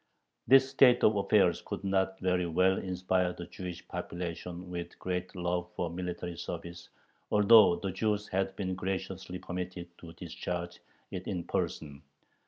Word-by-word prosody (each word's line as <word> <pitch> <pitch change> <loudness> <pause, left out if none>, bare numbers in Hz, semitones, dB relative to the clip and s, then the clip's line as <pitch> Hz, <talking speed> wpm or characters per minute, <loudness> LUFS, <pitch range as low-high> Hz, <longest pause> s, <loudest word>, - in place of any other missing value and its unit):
This 135 0 +7
state 135 -2 +5
of 105 - +5
affairs 100 - +3
could - - -5
not 95 -1 0
very 90 -1 +1
well 95 +3 +3
inspire 90 -1 0
the 90 - -7
Jewish 90 0 -8
population 90 +1 -5
with 85 -1 -5
a - - -22
great 90 +1 -3
love 90 0 -1
for 85 -2 -2
military 90 -1 -4
service, 85 +1 -7 0.4
although 105 -3 +7
the 95 +1 -3
Jews 105 +2 -1
had 95 0 -1
been 95 -2 -2
graciously 95 0 -4
permitted 90 -1 -6
to 85 -1 -11
discharge 85 +1 -5 0.3
it - - -5
in 90 -2 -2
person. 70 -4 -3
90 Hz, 150 wpm, -31 LUFS, 85-95 Hz, 0.4 s, This